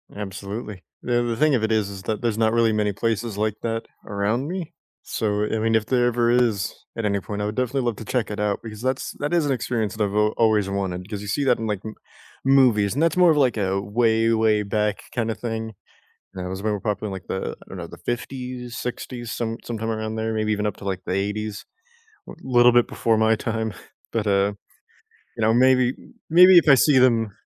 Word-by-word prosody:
Absolutely. 100 0 -6 0.2
The 120 -1 +1
the 115 -1 -2
thing 155 -1 +3
of 110 - 0
it 110 - 0
is 105 -2 +1
is 95 -1 -8
that 110 +1 -3
there's 115 -2 0
not 110 0 +2
really 115 -2 +3
many 105 -1 +1
places 115 0 -2
like 105 0 0
that 115 -1 -2 0.2
around 105 +7 -1
me. 180 -2 -5 0.3
So, 105 -1 -1
I 110 - -1
mean, 115 +1 +1
if 110 -1 +2
there 125 -2 +2
ever 120 -1 +2
is 115 -5 +1 0.2
at 115 -2 -3
any 100 -1 +1
point, 105 +2 -5
I - - -1
would 105 +1 -3
definitely 130 +1 0
love 120 -3 -1
to 110 - -9
check 120 -3 -1
it 105 0 -5
out, 105 -1 0
because 110 -1 -8
that's 130 0 -2
that 145 +4 -2
is 165 -3 +3
an 140 - 0
experience 115 -3 -2
that 105 - 0
I've 100 0 -1
a 105 0 +3
always 110 -3 +3
wanted, 95 -1 -3
'cause 105 -2 -5
you 105 - -7
see 140 +8 0
that 125 -2 +3
in 115 - -4
like 105 -2 -2
m 110 - -6 0.5
movies, 125 -7 +4
and 145 - -1
that's 165 +1 +2
more 180 -2 +6
of 150 - +2
like 130 -5 +2
a 95 -1 0
way, 115 +2 +2
way 110 -2 +2
back 105 0 -1
kind 115 -2 0
of - - -7
thing, 110 -2 -4 0.6
and 90 -1 -6
I - - -3
was 95 +1 -5
very 105 -1 -1
popular 105 -1 -2
in - - -6
like 95 -3 -8
the, 95 - -3
I - - -17
don't - - -8
know, - - -5
the - - -12
50s, 125 0 -5
60s, 120 -1 -5
some 115 -1 -3
sometime 115 -1 -3
around 110 0 -3
there, 110 0 -2
maybe 110 0 0
even 105 0 -1
up 105 - -2
to - - -11
like 95 -2 -2
the - - -3
‘80s, 105 +2 -3 0.6
a - - -7
little 120 -2 +5
bit 120 0 +4
before 115 -1 0
my 110 0 +4
time, 110 -2 -2 0.4
but 110 -2 -1
uh, 100 +1 +2 0.8
you - - -6
know, 110 +1 +4
maybe 130 0 +4 0.4
maybe 180 +2 +8
if 160 - +3
I 140 - +9
see 140 0 +4
them 115 -5 +3
110 Hz, 235 wpm, -23 LUFS, 105-120 Hz, 0.8 s, I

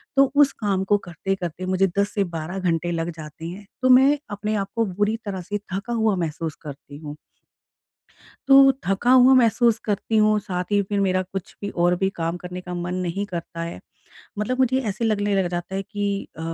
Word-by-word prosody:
तो 275 -1 +5
उस 285 -1 +6
काम 195 -2 +1
को 205 +2 +3
करते-करते 185 -1 -4
मुझे 190 +1 +2
10 200 0 0
से 200 - +1
12 170 +1 -5
घंटे 175 -2 0
लग 165 0 -2
जाते 155 +1 -9
हैं। 185 +5 -7 0.2
तो 255 - +3
मैं 265 +3 +6
अपने 210 +1 -2
आप 200 -2 -1
को 230 -1 +2
बुरी 205 +3 0
तरह 195 -3 -4
से 205 +4 -3 0.2
थका 200 +5 -3
हुआ 220 -3 +2
महसूस 165 -2 -3
करती 145 -1 -10
हूँ। 150 -1 -8 1.3
तो 270 0 +8
थका 195 +6 +1
हुआ 255 0 +7
महसूस 235 -2 +4
करती 210 +1 -1
हूँ 215 0 +4
साथ 180 -3 -3
ही 205 - +4
फ़िर 200 +1 -2
मेरा 185 -1 +2
कुछ 190 0 -7
भी 200 - -2 0.2
और 175 0 +4
भी 190 - +1
काम 165 +1 -2
करने 180 +1 -7
का 180 0 -7
मन 175 +1 -3
नहीं 185 +2 -2
करता 170 -2 -6
है। 170 - -6 0.6
मतलब 250 +5 -1
मुझे 260 0 +3
ऐसे 210 +3 -2
लगने 205 -2 +1
लग 190 -2 +2
जाता 175 +2 -4
है 195 - -1
कि 200 0 -3
अ, - - -8
195 Hz, 205 wpm, -23 LUFS, 175-215 Hz, 1.3 s, तो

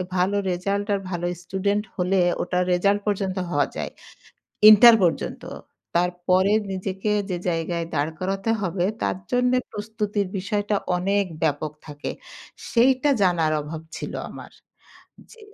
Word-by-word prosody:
ভালো 190 +3 +1
রেজাল্ট 200 +3 -1
আর - - -2
ভালো 175 -1 -2 0.2
স্টুডেন্ট 200 +3 -1
হলে 185 0 +1 0.2
ওটা 180 0 -1
রেজাল্ট 200 +3 +2
পর্যন্ত 195 -2 -1
হওয়া 145 -2 +2
যায় - - -4 0.8
ইন্টার 225 +2 +9
পর্যন্ত। 170 - -1 0.5
তারপরে 180 +2 +2 0.2
নিজেকে 190 +2 -3 0.2
যে 180 - -1
জায়গায় 170 0 -2
দাঁড় 145 +3 0
করাতে 195 +3 -2
হবে 180 -1 -1 0.2
তার - - 0
জন্যে 250 0 +2
প্রস্তুতির 210 -1 -3
বিষয়টা 205 +2 -1 0.2
অনেক 200 +2 +1 0.2
ব্যাপক 150 -1 0 0.2
থাকে। 145 -1 -5 0.6
সেইটা 255 +4 +3
জানার 170 -4 +2
অভাব 155 +2 -7 0.2
ছিল - - -6 0.2
আমার - - -11 0.8
জি। 465 - -16
190 Hz, 125 wpm, -24 LUFS, 175-205 Hz, 0.8 s, ইন্টার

